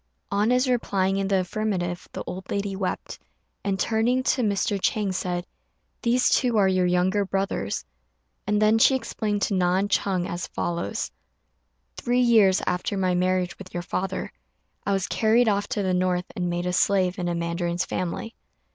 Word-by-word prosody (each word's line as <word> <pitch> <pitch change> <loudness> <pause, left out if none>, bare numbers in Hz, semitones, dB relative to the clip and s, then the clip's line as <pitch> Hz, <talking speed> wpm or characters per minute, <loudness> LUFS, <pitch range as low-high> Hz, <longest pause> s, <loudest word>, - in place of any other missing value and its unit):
On 205 +3 +2
his 250 +1 +3
replying 195 -6 +1
in 195 0 0
the 195 -1 +2
affirmative, 180 -2 -2
the - - -5
old 185 +1 -7
lady 200 -1 -2
wept, 190 -1 -4 0.4
and, 195 -1 -1
turning 235 +5 +1
to 255 - +1
Mr. 205 -2 0
Chang, 205 -1 +1
said, 180 -1 -2 0.6
"These 245 +1 +3
two 245 -3 +2
are 200 -2 +5
your 185 -1 +2
younger 180 +3 +2
brothers." 195 - -2 0.6
And 210 0 +2
then 215 +1 +4
she 265 - +6
explained 215 -4 -2
to - - 0
Na 180 -1 +2
and 200 +1 0
Ch'êng 185 -3 0
as 175 0 -4
follows: 170 - -3 0.9
"Three 245 +1 +1
years 220 -6 +5
after 180 +2 -1
my 185 -1 +1
marriage 180 0 +1
with 190 -2 -11
your 175 - -2
father, 190 +1 -3 0.5
I 200 - +2
was 195 -1 0
carried 225 +2 +3
off 205 -1 +1
to 220 -6 -2
the 185 -1 +1
north 180 0 +1
and 180 -1 -1
made 175 0 -2
a 180 - -1
slave 185 0 +2
in 175 - -1
a 175 - -1
mandarin's 170 +1 -1
family. 185 +5 -3
195 Hz, 175 wpm, -25 LUFS, 180-210 Hz, 0.9 s, she